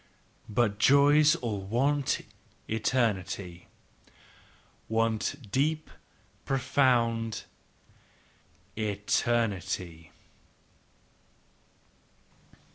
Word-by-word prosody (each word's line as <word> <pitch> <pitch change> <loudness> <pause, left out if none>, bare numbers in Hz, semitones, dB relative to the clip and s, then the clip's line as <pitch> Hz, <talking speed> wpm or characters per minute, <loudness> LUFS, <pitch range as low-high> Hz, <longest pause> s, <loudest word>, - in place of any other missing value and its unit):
"But 105 -2 0
joys 145 +5 +5
all 110 -9 -4
want 135 +8 0 0.5
eternity, 100 -6 -1 0.6
" - - -29
Want 115 +3 0 0.2
deep, 155 +5 0 0.5
profound 120 -4 +1 1.3
eternity!" 100 -5 -1
115 Hz, 45 wpm, -28 LUFS, 105-135 Hz, 1.3 s, joys